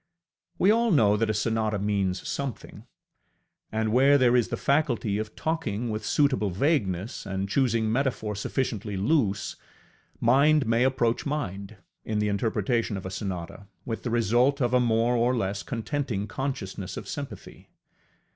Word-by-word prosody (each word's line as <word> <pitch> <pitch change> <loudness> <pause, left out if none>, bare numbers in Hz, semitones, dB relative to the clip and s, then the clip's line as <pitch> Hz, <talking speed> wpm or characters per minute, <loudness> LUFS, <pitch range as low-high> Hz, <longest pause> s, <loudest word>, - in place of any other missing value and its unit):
We 195 - +4
all 230 +1 +3
know 110 - +4
that 110 +1 0
a - - +2
sonata 110 0 0
means 100 -2 -1
something; 140 -5 -5 0.8
and 110 0 -1
where 135 +3 +6
there 125 -2 +4
is 120 -2 +3
the - - -3
faculty 125 -8 +1
of 110 0 -5
talking 125 -9 -2
with 110 0 -4
suitable 135 -8 +2
vagueness, 100 - -1
and 95 0 -3
choosing 115 -1 +1
metaphor 120 -4 -1
sufficiently 105 -1 -2
loose, 105 -2 0 0.6
mind 140 +4 +4
may 115 +2 +2
approach 125 -1 +1
mind, 100 -8 -4 0.3
in 110 - -2
the 105 0 +1
interpretation 110 +1 0
of 95 - -8
a 95 - -5
sonata, 95 0 -5 0.2
with 115 -2 -4
the 120 - -3
result 120 +5 +2
of 120 -2 0
a 125 - +5
more 120 0 +2
or 120 +2 +2
less 100 -2 -2
contenting 115 -2 -3
consciousness 100 -6 -5
of - - -7
sympathy. 140 -2 -8
115 Hz, 150 wpm, -26 LUFS, 100-130 Hz, 0.8 s, where